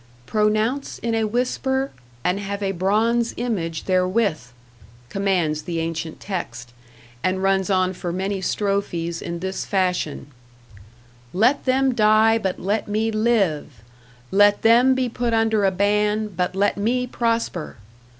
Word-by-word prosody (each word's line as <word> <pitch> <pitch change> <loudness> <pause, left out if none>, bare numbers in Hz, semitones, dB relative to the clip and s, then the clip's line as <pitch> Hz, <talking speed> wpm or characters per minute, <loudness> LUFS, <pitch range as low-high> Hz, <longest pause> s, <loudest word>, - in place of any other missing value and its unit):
"Pronounce 215 - 0
in 230 -1 -2
a 225 -1 +1
whisper, 265 +3 -1 0.3
and 180 +2 +1
have 200 0 -4
a 195 - 0
bronze 220 +6 +1
image 180 -10 -2
therewith," 185 - +1 0.6
commands 180 -6 0
the 165 +1 -4
ancient 165 -1 -4
text, 120 - -6 0.5
and 185 +1 0
runs 195 0 +2
on 185 -1 +2
for 175 -1 -5
many 190 +2 -2
strophes 180 -4 -1
in 170 -1 -5
this 190 +1 -3
fashion: 180 -7 -1 1.0
Let 230 +9 +2
them 260 0 +2
die, 220 0 +4
but 190 -4 -2
let 205 +4 -1
me 215 +2 0
live! 195 - 0 0.5
Let 205 +1 +4
them 245 +3 +5
be 260 -1 0
put 235 0 -1
under 220 -2 +2
a 190 - +3
ban, 210 +2 +1
but 180 -1 -2
let 200 +1 +1
me 245 +5 0
prosper! 230 -9 -2
200 Hz, 135 wpm, -22 LUFS, 180-225 Hz, 1.0 s, them